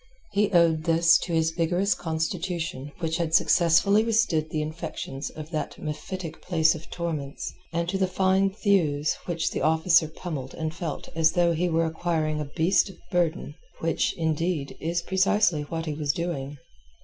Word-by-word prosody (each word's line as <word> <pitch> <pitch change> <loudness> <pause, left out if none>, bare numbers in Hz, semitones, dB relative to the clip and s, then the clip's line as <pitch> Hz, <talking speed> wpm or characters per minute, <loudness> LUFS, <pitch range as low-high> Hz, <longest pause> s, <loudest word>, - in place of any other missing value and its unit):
He 205 0 +2
owed 165 -3 +3
this 170 +1 +5
to 180 - -5
his 160 -1 +2
vigorous 175 +4 +1
constitution 160 -3 -3
which 165 0 -1
had 165 -2 0
successfully 180 +5 +4
withstood 215 -9 +1
the 155 -1 -1
infections 155 -3 -5
of 155 +1 -9
that 155 -3 -3
mephitic 160 +2 -6
place 160 -3 +3
of 160 0 -10
torments, 155 -5 -4 0.2
and 170 0 -1
to 190 +2 -1
the 190 - +2
fine 190 +1 +2
thews 175 -8 +1
which 170 -2 -1
the - - -3
officer 160 +1 +4
pummelled 150 -5 -6
and 160 0 -3
felt 165 -3 -5
as 160 0 +3
though 175 -1 +3
he 175 +2 0
were 165 0 +2
acquiring 160 -2 -1
a - - -3
beast 165 +8 +2
of 190 - -12
burden—which, 165 -1 -1
indeed, 160 -2 -1
is 170 +2 -1
precisely 190 -2 +2
what 165 +2 -4
he 155 - -2
was 145 -1 -1
doing. 145 -5 -4
165 Hz, 160 wpm, -26 LUFS, 155-175 Hz, 0.2 s, this